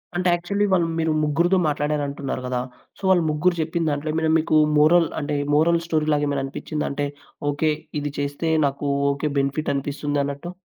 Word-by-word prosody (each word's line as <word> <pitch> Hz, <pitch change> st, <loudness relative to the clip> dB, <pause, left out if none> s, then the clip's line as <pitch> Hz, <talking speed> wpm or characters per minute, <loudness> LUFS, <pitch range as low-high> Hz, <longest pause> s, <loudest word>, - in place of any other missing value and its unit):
అంటే 180 Hz, +1 st, +1 dB
యాక్చువల్లీ 200 Hz, +4 st, 0 dB
వాళ్ళు 175 Hz, -3 st, +3 dB
మీరు 160 Hz, 0 st, +1 dB
ముగ్గురితో 170 Hz, +5 st, +2 dB
మాట్లాడారంటున్నారు 145 Hz, -2 st, -2 dB
గదా! 125 Hz, -1 st, -1 dB, 0.4 s
సో -, -, -19 dB
వాళ్ళు 180 Hz, -3 st, +4 dB
ముగ్గురు 155 Hz, +4 st, +1 dB
జప్పిన 160 Hz, +1 st, -1 dB
దాంట్లో 145 Hz, +1 st, -2 dB, 0.3 s
మీకు 155 Hz, -, 0 dB, 0.2 s
మోరల్ 165 Hz, +3 st, +5 dB
అంటే 150 Hz, -1 st, -2 dB, 0.2 s
మోరల్ 165 Hz, +3 st, +4 dB
స్టోరీలాగేమైనా 150 Hz, -3 st, 0 dB
అనిపిచ్చిందా? 150 Hz, +2 st, -4 dB
అంటే 145 Hz, +1 st, -2 dB, 0.5 s
ఓకే. 155 Hz, +2 st, +1 dB, 0.3 s
ఇది 145 Hz, 0 st, -3 dB
చేస్తే 145 Hz, +3 st, -2 dB, 0.2 s
నాకు 140 Hz, +1 st, -2 dB, 0.2 s
ఓకే. 140 Hz, +2 st, -2 dB
బెనిఫిట్ 140 Hz, +3 st, -1 dB
అనిపిస్తుందన్నట్టు. 145 Hz, +2 st, -2 dB
150 Hz, 145 wpm, -23 LUFS, 145-165 Hz, 0.5 s, మోరల్